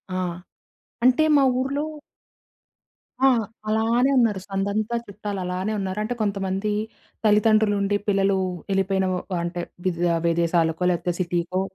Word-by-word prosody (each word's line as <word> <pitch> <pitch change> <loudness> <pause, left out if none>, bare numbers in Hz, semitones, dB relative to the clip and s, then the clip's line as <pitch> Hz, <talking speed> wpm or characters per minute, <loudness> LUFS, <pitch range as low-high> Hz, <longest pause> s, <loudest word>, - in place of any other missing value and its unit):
ఆ! - - 0 0.9
అంటే 255 +5 +5
మా 280 - +5 0.2
ఊర్లో 275 +3 -1 1.4
ఆ! - - +8 0.4
అలానే 230 +4 +2
ఉన్నారు. 225 -6 +3
సందంతా 200 +4 -1
చుట్టాలలానే 195 -1 -4
ఉన్నారు. 190 +1 -3
అంటే, 245 - -2
కొంతమందీ 195 0 -1 0.5
తల్లితండ్రులుండి 210 -1 +3
పిల్లలూ 195 -1 +2 0.3
యెళ్ళిపోయిన 190 0 +1
వ - - -1 0.3
అంటే, 175 +1 -3 0.2
విద్ 175 -2 -1 0.3
విదేశాలకో, 165 0 +1
లేపోతే 175 0 -1
సిటీకో. 175 +1 -1
195 Hz, 105 wpm, -24 LUFS, 185-215 Hz, 1.4 s, ఆ